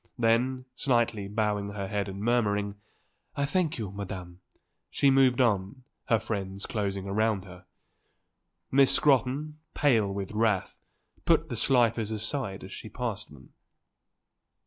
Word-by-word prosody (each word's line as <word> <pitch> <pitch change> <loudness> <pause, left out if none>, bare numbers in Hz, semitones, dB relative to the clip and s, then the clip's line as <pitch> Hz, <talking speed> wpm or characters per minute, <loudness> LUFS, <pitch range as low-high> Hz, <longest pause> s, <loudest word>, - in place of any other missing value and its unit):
Then, 125 +2 +1
slightly 120 -6 +1
bowing 105 -1 -1
her 100 -2 -4
head 100 0 -2
and 95 +1 -6
murmuring: 105 -4 +1 0.6
"I 140 - 0
thank 165 +2 0
you, 105 -5 -4
Madam," 95 -3 -7 0.5
she 140 - +3
moved 135 -1 +4
on, 110 0 +1 0.2
her 115 - +3
friends 100 -3 -4
closing 100 -3 -2
round 105 0 0
her. 90 0 -13 1.0
Miss 135 0 +5
Scrotton, 145 +2 +2 0.2
pale 115 -9 +3
with 100 -1 -4
wrath, 105 -3 0 0.4
put 160 -1 +2
the 120 - -3
Slifers 115 -2 +2
aside 110 -1 -3
as 95 - -9
she 110 - -8
passed 110 -5 -4
them. 65 -4 -16
110 Hz, 130 wpm, -28 LUFS, 100-125 Hz, 1.0 s, Miss